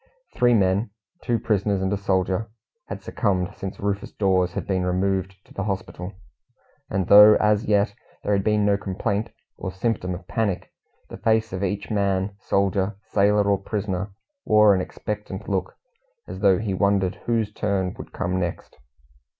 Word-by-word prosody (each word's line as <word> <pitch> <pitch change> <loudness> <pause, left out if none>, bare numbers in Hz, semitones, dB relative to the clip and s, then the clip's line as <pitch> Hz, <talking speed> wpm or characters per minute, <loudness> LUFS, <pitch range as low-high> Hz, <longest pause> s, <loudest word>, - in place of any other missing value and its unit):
Three 120 -1 +4
men 100 +2 +2 0.3
two 120 -2 0
prisoners 100 -2 0
and 95 +1 0
a - - +2
soldier 95 +2 0 0.4
had - - -7
succumbed 95 -3 -1
since 95 -1 -6
Rufus 100 0 -2
Dawes 95 -3 +1
had - - -4
been 95 -2 0
removed 95 +1 0
to - - -18
the 100 - -3
hospital; 95 -1 -4 0.8
and 95 -1 0
though 105 +2 +9
as 105 0 +2
yet 100 0 +2 0.3
there 105 - +1
had 100 -1 +1
been 105 -1 +2
no 100 -1 +3
complaint 100 +2 -2 0.3
or 95 - -5
symptom 95 -2 -2
of 90 0 -11
panic, 100 -2 -2 0.4
the - - -8
face 110 0 +1
of 95 +1 -3
each 100 +1 -2
man, 100 -1 0
soldier, 100 +1 0
sailor, 105 +1 +3
or 100 -1 +2
prisoner, 100 -1 -3 0.3
wore 105 -1 +6
an 95 - +1
expectant 105 +1 -6
look, 95 -2 -2 0.5
as - - -7
though 95 -3 +4
he 100 0 -2
wondered 100 -1 +1
whose 115 -3 0
turn 95 -4 -1
would - - -9
come 90 0 -2
next. 85 -7 -4
100 Hz, 165 wpm, -24 LUFS, 95-105 Hz, 0.8 s, though